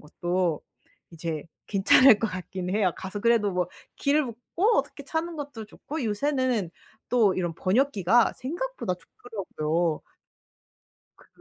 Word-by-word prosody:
것도 175 +1 -1 0.5
이제 160 -2 -4 0.2
괜찮을 210 +4 +6
것 225 - 0
같긴 185 -1 -5
해요. 195 -3 +2
가서 190 +2 -6
그래도 225 -3 +3
뭐 180 -1 0 0.3
길을 290 +1 +2
묻고 335 - 0
어떻게 - - -3
타는 330 0 -3
것도 280 -7 -6
좋고 305 +6 -6
요새는 245 - 0 0.4
또 220 -6 +4
이런 175 -2 -1
번역기가 225 +1 +3
생각보다 340 - -3
좋더라고요. 170 -7 -3 1.2
그 - - -21
210 Hz, 270 characters per minute, -26 LUFS, 180-260 Hz, 1.2 s, 괜찮을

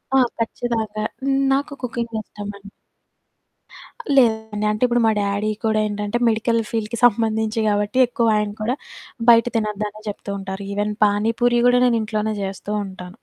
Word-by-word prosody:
ఆ! - - +6 0.2
ఖచ్చితంగా. 225 -2 -2 0.5
నాకు 280 +1 0
కుకింగిష్టమండి. 215 -4 -5 1.5
లేదండి. 220 -4 +2
అంటే, 215 +3 -2
ఇప్పుడు 240 0 +2
మా 220 - +4
డ్యాడీ 200 +1 0 0.2
కూడా 220 -1 +2
ఏంటంటే, 205 +2 -2
మెడికల్ 230 +1 +1
ఫీల్డ్‌కి 225 0 -2
సంబంధించి 220 0 +1
గాబట్టి, 205 +3 0
ఎక్కువ 235 -1 0
ఆయన 210 -1 -1
కూడా 235 +4 0 0.5
బయట 230 0 +7
తినొద్దనే 215 -1 -2
జెప్తూ 200 0 -5
ఉంటారు. 190 +1 -6
ఈవెన్ 210 +1 -1
పానీ 210 +2 +2
పూరి 240 0 +4
గూడా 245 0 +5
నేనింట్లోనే 220 -2 0
జేస్తూ 195 +2 -5
ఉంటాను. 185 -1 -10
215 Hz, 130 wpm, -21 LUFS, 205-230 Hz, 1.5 s, బయట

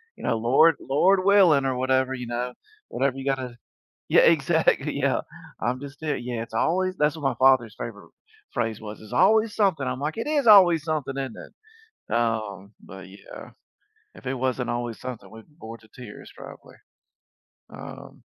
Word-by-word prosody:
you - - -14
know, 115 -2 0
Lord 135 +8 +4
Lord 185 +8 +2
willing," 185 -9 +5
or 130 - 0
whatever, 130 +1 0
you 125 - -6
know, 120 +1 -4 0.3
whatever 135 0 -1
you 135 - -7
gotta 130 -3 -3 0.5
Yeah, - - +5
exactly, - - +2
yeah, - - +1 0.4
I'm 125 +4 -2
just 140 0 -10
there 150 -3 -2
Yeah, 120 -2 -5
it's 115 - -11
always 185 +8 0
that's 150 +1 +1
what 160 - -10
my 135 -3 +1
father's 130 -5 +3
favorite 105 -3 -8 0.4
phrase 115 -2 -2
was, 110 -1 -9
"it's 110 - -13
always 220 0 +3
something," 190 -9 +1
I'm 125 0 -3
like, 150 +6 -3
"It 230 - -4
is 290 -4 0
always 180 -7 +7
something, 150 -4 -3
isn't 135 -4 -5
it?" 440 +1 -15 0.4
Um, 110 -4 -2
but 95 -1 -12
yeah, 100 +1 -12 0.6
if - - -15
it 135 - -1
wasn't 130 -1 -2
always 120 -1 -4
something, 125 -3 -8
we'd 110 +4 -14
be 150 - -27
bored 115 -6 -10
to 110 - -21
tears 115 -2 -12
probably, - - -13 0.9
um - - -11
130 Hz, 175 wpm, -24 LUFS, 115-155 Hz, 0.9 s, always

